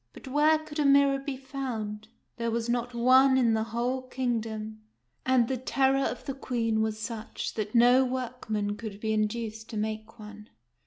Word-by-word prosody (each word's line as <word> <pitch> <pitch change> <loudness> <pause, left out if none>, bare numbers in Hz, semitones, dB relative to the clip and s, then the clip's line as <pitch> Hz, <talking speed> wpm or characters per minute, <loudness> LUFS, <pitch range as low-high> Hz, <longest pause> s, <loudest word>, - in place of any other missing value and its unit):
But - - -12
where 300 +4 +4
could 310 -1 -8
a - - +3
mirror 280 0 +5
be 275 -1 -5
found? 235 -6 -5 0.3
There 235 -1 -1
was 230 0 -1
not 240 0 -1
one 260 +2 +5
in 235 -3 +3
the 220 0 0
whole 240 +3 -2
kingdom; 220 -4 -3 0.5
and 255 -3 +4
the 260 - -1
terror 270 +2 +2
of - - -4
the 275 - -3
Queen 230 -5 -1
was 220 -1 -1
such 220 0 -5
that 215 +1 -4
no 245 +2 +6
workman 235 -5 -3
could 215 -3 -7
be 220 0 -1
in 215 0 +2
duced 220 0 -6
to 220 - -5
make 220 +1 -4
one. 210 -1 -11
235 Hz, 180 wpm, -28 LUFS, 220-260 Hz, 0.5 s, no